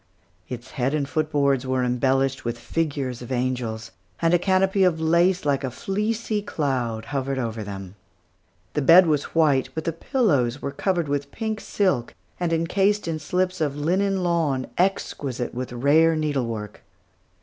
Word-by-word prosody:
Its 125 0 -7
head 135 +1 0
and 145 -2 -1
foot 155 +1 -1
boards 140 -3 +2
were 130 0 +1
embellished 135 +2 +1
with 120 0 -3
figures 135 -2 -2
of 120 - -8
angels; 120 -3 -2 0.3
and 165 0 +2
a 175 - +5
canopy 190 +1 +2
of 175 -3 +3
lace 170 +3 +2
like 140 -1 +1
a 130 - -1
fleecy 210 - -2
cloud 125 - -2
hovered 135 0 -1
over 115 -3 -3
them. 95 -2 -7 0.8
The 150 - 0
bed 170 +6 +8
was 150 -2 -1
white, 140 -5 +3
but 160 - -3
the 165 - -1
pillows 145 - +1
were 140 - -4
covered 175 0 -1
with 140 0 -2
pink 220 -1 -3
silk 185 - 0 0.2
and 175 -2 0
encased 190 +5 +1
in 160 -1 -2
slips 180 +3 -1
of 145 -3 0
linen 185 +5 0
lawn, 160 -7 +1
exquisite 140 -9 -1
with 125 +1 -5
rare 150 +7 +4
needlework. 120 -9 -2
145 Hz, 160 wpm, -24 LUFS, 130-175 Hz, 0.8 s, bed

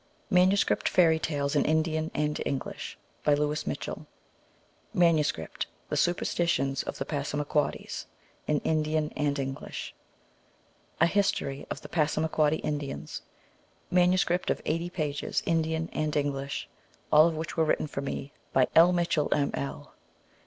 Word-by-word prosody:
Manuscript 185 +2 +3
Fairy 165 -3 +4
Tales 145 -2 -1
in 145 - +4
Indian 160 0 +1
and 150 0 0
English. 135 -2 -4 0.3
By 150 - +4
Louis 150 +1 -1
Mitchell. - - -4 0.9
Manuscript: 160 - +2 0.2
The - - -1
Superstitions 170 -6 +1
of - - -6
the - - -3
Passamaquoddies. 145 0 -2 0.4
In 150 -1 +1
Indian 155 -1 0
and 145 -1 0
English. 135 -1 -5 1.1
A 170 - +6
History 170 -7 0
of - - -5
the - - -10
Passamaquoddy 155 -1 +1
Indians. 140 - -4 0.7
Manuscript 180 0 +3
of - - +1
80 165 +2 -1
pages, 150 -5 -2
Indian 160 0 0
and 155 -1 -1
English. 140 -1 -2 0.4
All 155 +2 +8
of 165 - -1
these 160 +1 -4
were 160 - +3
written 155 - +1
for 140 -2 -4
me 140 +1 -5 0.2
by 130 -1 +5
L. 170 +2 +8
Mitchell, 170 -4 +1
M. 145 -1 +2
L. 70 +1 -5
155 Hz, 130 wpm, -28 LUFS, 145-165 Hz, 1.1 s, All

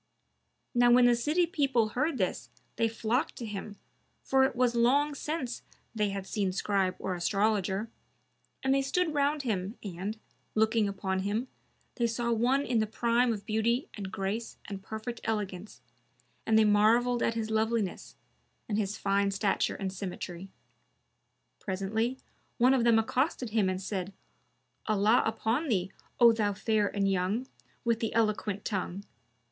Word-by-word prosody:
Now 245 -1 +5
when 245 0 +6
the 245 - +6
city 300 +9 +2
people 275 - +1
heard 285 +6 -1
this, 180 - -2 0.3
they 230 0 +2
flocked 225 +4 -1
to 235 - -6
him, 205 -1 -6 0.5
for 265 0 +3
it 265 - -2
was 245 -1 +2
long 275 +5 +3
since 280 -4 -4 0.3
they 210 -2 0
had 195 -1 -4
seen 195 -1 -1
Scribe 190 -1 0
or 190 - -3
Astrologer, 195 +2 0 0.8
and 265 0 +3
they 275 - +3
stood 315 +4 0
round 290 0 +1
him 205 -3 -2
and, 200 +2 -5 0.4
looking 220 -1 +3
upon 190 -1 -2
him, 210 +6 -2 0.5
they 235 -2 +2
saw 235 +1 -1
one 250 +5 +2
in 240 -3 +1
the 215 - +1
prime 235 +2 +2
of 205 -3 -4
beauty 230 +4 0
and 195 -3 -6
grace 200 +4 -3
and 195 -1 -6
perfect 220 +4 -6
elegance, 205 -3 -4 0.7
and 220 -1 +4
they 220 - +6
marvelled 230 +4 +4
at 230 - +1
his 220 -1 -2
loveliness, 220 -3 -1 0.5
and 210 -1 0
his 210 +1 -2
fine 200 0 +1
stature 195 0 0
and 190 -2 -4
symmetry. 185 -1 -6 1.1
Presently 215 +6 -2 0.4
one 255 +2 +5
of 255 -3 +2
them 230 -1 +5
accosted 250 +1 0
him 210 -4 +2
and 185 0 -2
said, 190 -1 -4 0.7
"Allah 215 +2 +4
upon 225 +7 0
thee, 190 -6 0 0.3
O 235 -1 +8
thou 210 -2 0
fair 210 +1 +1
and 200 0 0
young, 195 +6 0 0.4
with 230 -1 +2
the 225 - -2
eloquent 215 -2 0
tongue! 195 -1 -3
220 Hz, 155 wpm, -30 LUFS, 200-240 Hz, 1.1 s, O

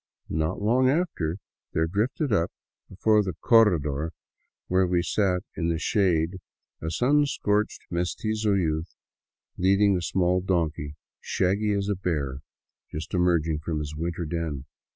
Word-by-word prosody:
Not 80 0 -1
long 125 +5 +3
after 130 - 0 0.4
there 80 - +2
drifted 115 - -1
up 85 -4 +1 0.4
before 105 +3 +3
the 95 -5 -3
corredor 80 - +3 0.5
where 95 0 +2
we 90 -1 +1
sat 95 0 +1
in 85 - -1
the 85 - 0
shade 90 -1 +1 0.4
a 80 - -2
sun 145 - +3
scorched 105 -5 0
mestizo 105 +4 0
youth 80 -2 -1 0.6
leading 100 +2 +4
a 90 - -1
small 90 +2 +1
donkey, 80 -5 -1 0.2
shaggy 100 +3 0
as 100 -1 -1
a 105 - +1
bear 75 -8 -2 0.5
just 75 +1 -6
emerging 85 -4 +2
from 80 +1 -3
his 75 0 -4
winter's 85 0 -3
den. 80 -5 -3
90 Hz, 135 wpm, -26 LUFS, 80-105 Hz, 0.6 s, leading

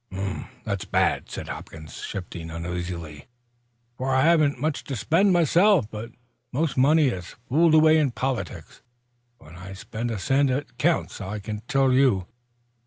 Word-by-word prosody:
"That's 100 -1 -3
bad," - - +1
said - - -6
Hopkins, 80 0 -9
shifting 85 -3 -6
uneasily, 85 -3 -5 0.7
"for 130 +1 0
I 130 - +4
haven't 155 -4 +3
much 155 +2 -1
to 135 - -4
spend, 185 - +2
myself. 175 - +4
But 110 +2 -6 0.4
most 150 +3 -1
money 145 +2 +4
is 90 -7 -6
fooled 160 +4 +4
away 155 0 +6
in 145 -3 +2
politics. 120 - -4 0.6
When 80 -5 -15
I 95 +2 -9
spend 110 +5 -5
a 115 - -3
cent 135 +9 +2
it 130 -1 -3
counts, 165 -5 0
I 100 +2 -4
can 105 +1 -6
tell 135 -1 +3
you." 130 -9 +3
125 Hz, 150 wpm, -25 LUFS, 95-150 Hz, 0.7 s, away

